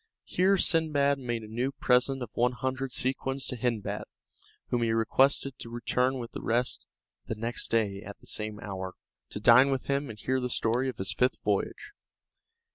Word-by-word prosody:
Here 190 +2 +2
Sindbad 150 -5 +3
made 120 -3 -3
a - - -9
new 120 +5 -1
present 130 0 +2
of 115 - -8
one 125 +1 +2
hundred 130 +2 -3
sequins 135 +1 -1
to - - -2
Hindbad, 115 -3 -2 0.6
whom 120 - 0
he 115 -1 +2
requested 130 +4 +2
to 115 - -7
return 125 +3 0
with 120 -2 -6
the - - -6
rest 120 +2 0 0.4
next 115 +2 -2
day 105 -4 0
at 100 -1 -9
the - - -20
same 105 -1 -4
hour, 95 -2 -5 0.3
to - - -6
dine 120 +5 +7
with 135 -1 0
him 140 0 -1
and 110 - -8
hear 130 +4 0
the 125 -1 -2
story 120 +3 +1
of 125 - -6
his 95 - -2
fifth 125 +1 +1
voyage. - - -1
125 Hz, 180 wpm, -29 LUFS, 115-135 Hz, 0.6 s, dine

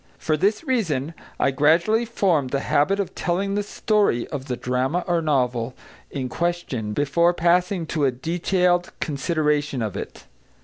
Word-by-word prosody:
For 155 - 0
this 200 - +1
reason, 170 - -1 0.3
I - - +3
gradually 170 - +3
formed 180 - +1
the 140 +1 -1
habit 195 +10 +2
of 200 - -2
telling 195 +3 -1
the 205 - +1
story 205 - +1
of 140 -3 -5
the 125 -2 -2
drama 130 +8 -1
or 175 -2 +1
novel 125 -5 0 0.3
in 130 -3 -3
question 155 -8 -2
before 170 +7 +2
passing 175 +1 +2
to 155 -2 0
a 135 - +3
detailed 175 +6 0
consideration 150 -3 0
of 105 -3 -4
it. - - -7
160 Hz, 150 wpm, -23 LUFS, 135-180 Hz, 0.3 s, I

